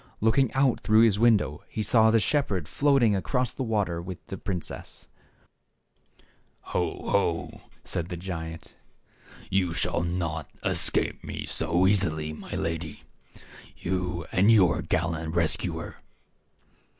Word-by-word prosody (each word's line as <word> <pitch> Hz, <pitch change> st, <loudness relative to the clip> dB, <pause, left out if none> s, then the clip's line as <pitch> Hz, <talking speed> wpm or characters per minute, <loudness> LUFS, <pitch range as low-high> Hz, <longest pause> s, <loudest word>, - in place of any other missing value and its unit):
Looking 115 Hz, +4 st, +3 dB
out 135 Hz, -2 st, +2 dB
through 110 Hz, +1 st, +4 dB
his 110 Hz, -3 st, +4 dB
window, 115 Hz, -3 st, +2 dB
he 110 Hz, -, -3 dB
saw 110 Hz, +1 st, +4 dB
the 115 Hz, 0 st, +4 dB
shepherd 105 Hz, -, 0 dB
floating 135 Hz, -7 st, +3 dB
across 110 Hz, +8 st, -1 dB
the -, -, -7 dB
water 105 Hz, -8 st, -1 dB
with 90 Hz, 0 st, -7 dB
the -, -, -4 dB
princess. 90 Hz, -3 st, -6 dB, 1.7 s
"Ho, -, -, -2 dB
ho!" -, -, 0 dB, 0.2 s
said 85 Hz, +1 st, -4 dB
the 90 Hz, -, -5 dB
giant; 80 Hz, -3 st, -7 dB, 0.8 s
"you 90 Hz, -3 st, +1 dB
shall -, -, +1 dB
not 85 Hz, -3 st, -3 dB, 0.2 s
escape -, -, +1 dB
me -, -, -5 dB
so 85 Hz, +3 st, +1 dB
easily, 80 Hz, -6 st, +1 dB
my 75 Hz, -, -8 dB
lady 80 Hz, -2 st, -4 dB, 0.4 s
— -, -, -19 dB
you 90 Hz, -2 st, -2 dB
and 95 Hz, +4 st, +4 dB
your 90 Hz, -6 st, +4 dB
gallant 80 Hz, 0 st, -2 dB
rescuer." 85 Hz, -2 st, -1 dB
90 Hz, 125 wpm, -27 LUFS, 85-110 Hz, 1.7 s, through